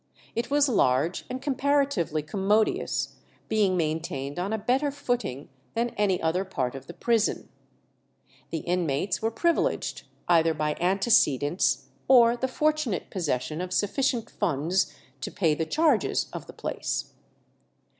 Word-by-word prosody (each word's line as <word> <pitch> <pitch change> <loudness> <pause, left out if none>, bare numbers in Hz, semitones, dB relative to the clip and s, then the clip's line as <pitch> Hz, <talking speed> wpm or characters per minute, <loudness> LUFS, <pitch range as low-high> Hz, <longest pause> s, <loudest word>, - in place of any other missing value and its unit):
It 235 +2 -2
was 290 0 +4
large 160 - +2
and 255 +1 -5
comparatively 275 - +1
commodious, 205 +6 0 0.3
being 205 -4 +2
maintained 155 -3 -2
on 190 +3 -2
a 220 - 0
better 255 +7 +1
footing 245 - -3 0.3
than 235 +1 +1
any 200 -3 +1
other 165 +4 0
part 135 -10 -2
of 135 0 -9
the - - -8
prison. 230 -2 0 1.0
The 160 - -3
inmates 175 0 -1
were 225 - +1
privileged, 335 +9 0 0.2
either 165 -2 +4
by 150 0 -1
antecedents 180 - +2 0.2
or 240 -2 +6
the 260 +2 -1
fortunate 300 - 0
possession 155 -2 -2
of 180 0 -5
sufficient 230 +5 0
funds 180 +1 0 0.3
to - - -4
pay 165 -6 +1
the 160 +1 -2
charges 305 - +2
of - - -7
the - - -10
place. - - -3
190 Hz, 135 wpm, -27 LUFS, 160-240 Hz, 1.0 s, or